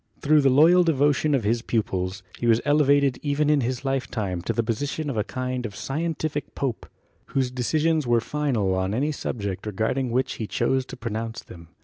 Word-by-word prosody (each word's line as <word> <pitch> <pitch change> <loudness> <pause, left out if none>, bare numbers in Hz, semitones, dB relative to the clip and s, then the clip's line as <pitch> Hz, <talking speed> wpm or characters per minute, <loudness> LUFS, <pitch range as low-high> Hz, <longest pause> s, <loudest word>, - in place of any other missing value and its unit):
Through 150 +1 +4
the 135 - +4
loyal 165 +7 +6
devotion 145 -1 +2
of 130 - 0
his 115 +3 +1
pupils, 95 -5 -2 0.2
he 120 - -1
was 115 -1 +5
elevated 140 -3 +3
even 145 +1 +1
in 150 -2 +3
his 125 +2 -3
lifetime 115 -9 -2
into 85 - -2
the 115 - 0
position 140 +6 -2
of - - -5
a 105 - +1
kind 125 +1 -3
of 105 -4 -6
scientific 155 +2 -3
pope, 130 -5 -3 0.4
whose 130 -2 -1
decisions 155 +4 +1
were 120 -1 +4
final 120 -7 -1
on 95 +2 -1
any 145 +5 0
subject 100 -8 -4
regarding 110 +5 -1
which 125 +3 -1
WERNER 110 - -2
AND - - -12
HUTTON - - -4
51 120 - +2
he - - +3
chose 130 - -2
to - - -9
pronounce 115 -1 -4
them. 85 -2 -13
130 Hz, 210 wpm, -24 LUFS, 110-145 Hz, 0.4 s, loyal